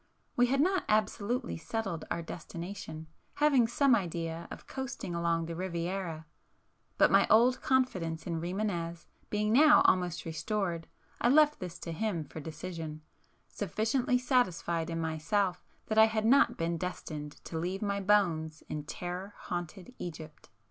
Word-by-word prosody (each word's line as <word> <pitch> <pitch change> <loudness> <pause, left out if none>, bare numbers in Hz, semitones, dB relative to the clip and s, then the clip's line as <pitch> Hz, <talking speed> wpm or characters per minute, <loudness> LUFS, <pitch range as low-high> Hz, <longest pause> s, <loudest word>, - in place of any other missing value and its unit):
We 245 0 +4
had 275 +2 +2
not 370 +3 +2
absolutely 215 +3 0
settled 195 -1 -3
our 170 - -2
destination, 165 -1 -7 0.3
having 280 -6 +4
some 265 +3 +3
idea 170 -5 -1
of - - -9
coasting 265 -9 -5
along 170 -1 0
the 165 0 -5
Riviera,—but 170 -2 -3
my - - +5
old 240 +3 +5
confidence 185 -12 0
in 165 -2 -2
Rimânez 175 -2 -3 0.2
being 210 +1 +1
now 300 +4 +7
almost 180 -2 +2
restored, 165 +1 -2 0.3
I 240 - +4
left 300 +2 +5
this 180 -1 -6
to 165 - -5
him 170 -1 -1
for 155 - -9
decision, 160 0 -6 0.4
sufficiently 245 +3 0
satisfied 180 - +1
in 165 0 -2
myself 175 +4 0 0.2
that 220 0 +2
I 220 - +10
had 220 -1 -1
not 275 +5 +5
been 165 0 -1
destined 155 -4 -5
to 165 - -4
leave 185 +5 -2
my 200 -1 0
bones 170 -6 +2
in 150 -1 -5
terror 180 +5 -5
haunted 175 +5 -6
Egypt. 155 -5 -8
180 Hz, 140 wpm, -31 LUFS, 165-220 Hz, 0.4 s, I